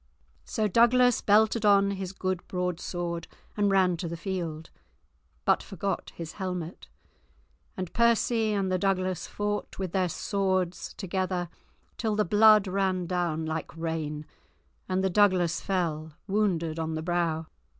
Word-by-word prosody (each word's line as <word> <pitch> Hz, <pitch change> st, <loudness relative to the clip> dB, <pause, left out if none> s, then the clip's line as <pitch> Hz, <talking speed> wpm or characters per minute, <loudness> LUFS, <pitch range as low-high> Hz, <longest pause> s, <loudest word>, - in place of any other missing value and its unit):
So 215 Hz, -2 st, 0 dB
Douglas 240 Hz, +3 st, +4 dB
belted 220 Hz, +2 st, +3 dB
on 200 Hz, -1 st, +5 dB
his 190 Hz, -2 st, -4 dB
good 185 Hz, -2 st, -3 dB
broadsword, 175 Hz, -1 st, -3 dB, 0.3 s
and 205 Hz, -1 st, +2 dB
ran 185 Hz, -3 st, +3 dB
to 170 Hz, -, -4 dB
the 170 Hz, +1 st, -5 dB
field, 165 Hz, -3 st, -4 dB, 0.7 s
but -, -, +3 dB
forgot 195 Hz, -1 st, -4 dB
his 165 Hz, -1 st, -6 dB
helmet, 180 Hz, -3 st, -5 dB, 0.9 s
and 185 Hz, -2 st, -5 dB
Percy 235 Hz, -1 st, +3 dB
and 195 Hz, -2 st, 0 dB
the 185 Hz, -, +1 dB
Douglas 185 Hz, -2 st, 0 dB
fought 205 Hz, 0 st, -3 dB
with 190 Hz, -3 st, -3 dB
their 185 Hz, -1 st, +1 dB
swords 185 Hz, -2 st, -1 dB
together 185 Hz, -2 st, -2 dB, 0.5 s
till 220 Hz, -3 st, -1 dB
the 210 Hz, -, +2 dB
blood 215 Hz, +2 st, +6 dB
ran 190 Hz, -1 st, 0 dB
down 170 Hz, -3 st, -1 dB
like 160 Hz, 0 st, -4 dB
rain, 155 Hz, -2 st, -3 dB, 0.6 s
and 185 Hz, 0 st, +1 dB
the 190 Hz, -, +2 dB
Douglas 180 Hz, -4 st, +3 dB
fell, 160 Hz, -5 st, -2 dB
wounded 175 Hz, -6 st, 0 dB
on 160 Hz, 0 st, -2 dB
the 155 Hz, -, -3 dB
brow. 170 Hz, -2 st, 0 dB
185 Hz, 140 wpm, -28 LUFS, 170-200 Hz, 0.9 s, blood